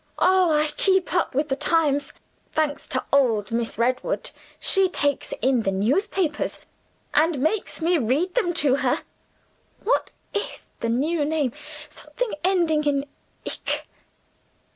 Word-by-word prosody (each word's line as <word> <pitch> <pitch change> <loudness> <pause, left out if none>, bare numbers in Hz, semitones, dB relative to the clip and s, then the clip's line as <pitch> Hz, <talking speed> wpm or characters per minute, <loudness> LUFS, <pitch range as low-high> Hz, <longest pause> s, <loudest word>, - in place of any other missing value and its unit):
Oh, 370 -2 +4
I 300 0 +2
keep 380 -2 +2
up 350 -7 +1
with 290 +2 +1
the 270 - +1
times, 290 -1 +1 0.4
thanks 305 -2 -1
to - - -2
old 230 -7 +3
Miss 230 0 -2
Redwood! 255 - 0 0.3
She 385 -2 +4
takes 285 -5 -1
in 255 -2 +3
the 195 - 0
newspapers, 300 - 0 0.5
and 315 0 +3
makes 320 +4 -1
me 345 0 +3
read 285 +10 0
them 430 -9 +1
to 270 -1 +4
her. - - 0 0.8
What 470 - +1 0.2
is 410 - -3
the 230 - -1
new 295 +7 +1
name? 295 -4 0 0.4
Something - - -5
ending 340 -5 +2
in 280 -1 +1 0.4
ic. - - -3
300 Hz, 135 wpm, -24 LUFS, 270-360 Hz, 0.8 s, Oh